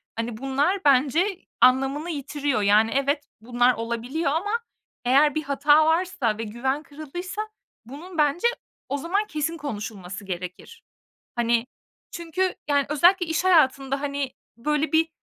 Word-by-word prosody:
hani, 230 0 -4
bunlar 275 - 0
bence 300 +8 +2 0.2
anlamını 270 +5 +3
yitiriyor. 285 -5 -2
Yani, 210 +2 +4
evet, 280 +2 +1 0.2
bunlar 245 +2 +2
olabiliyor 235 +7 -2
ama 350 +7 -1 0.5
eğer 280 +4 +4
bir 310 - -1
hata 290 +2 +4
varsa 320 - +1
ve 225 - -4
güven 265 +7 -2
kırıldıysa 350 +7 -6 0.4
bunun 320 +9 -10
bence 300 +8 +3 0.4
o 280 - -1
zaman 385 +8 -1
kesin 320 -2 -2
konuşulması 205 - -6
gerekir. 185 - -7 0.5
Hani, 235 0 +1 0.4
çünkü, 345 +2 -2
yani, 285 -1 +2
özellikle 350 +5 +4
iş 320 +2 -1
hayatında, 275 -6 +3
hani, 280 -2 -3 0.2
böyle, 300 +6 -1
bir 320 +1 +3
285 Hz, 130 wpm, -24 LUFS, 245-320 Hz, 0.5 s, Yani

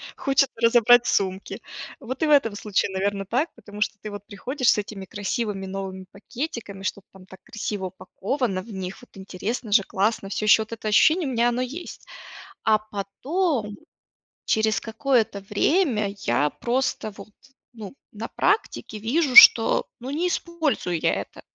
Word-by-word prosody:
хочется 275 0 +1
разобрать 235 +1 +5
сумки. 190 0 -1 0.4
Вот 260 +5 -5
и - - +2
в - - +1
этом 250 -8 +4
случае, 205 -1 -1
наверно, 195 +1 -2
так, 260 - 0
потому 205 0 -11
что 215 - 0
ты 215 - -5
вот 205 0 -8
приходишь 250 +6 0
с - - +1
этими 200 -2 -7
красивыми 205 +1 -3
новыми 190 -1 -6
пакетиками, 220 -3 -7
что-то 200 0 -4
там 190 -1 -15
так 190 0 -14
красиво 205 -2 -5
упаковано 195 +3 -3
в 215 +3 -11
них, 190 -1 -6
вот 245 - -18
интересно 200 +4 -5
же, 205 -1 +5
классно, 195 +1 -1
всё 215 - -3
ещё 215 +1 +6
вот 220 - -10
это 220 -1 -6
ощущение 315 - +4
у - - -3
меня 240 0 +2
оно 240 +1 -1
есть. 280 +8 -7 0.6
А 220 -1 +4
потом, 215 - -3 0.7
через 220 -1 +1
какое-то 225 -3 0
время 235 - +2
я 140 +2 +1
просто 240 - -2
вот, 205 +1 -12 0.4
ну, 220 -1 -10 0.2
на 220 +2 -6
практике 385 - -1
вижу, 255 +5 0
что, 225 -2 +9
ну, 255 +3 -6
не 320 +5 -1
использую 320 - -1
я - - +1
это. - - -6
215 Hz, 160 wpm, -24 LUFS, 200-255 Hz, 0.7 s, что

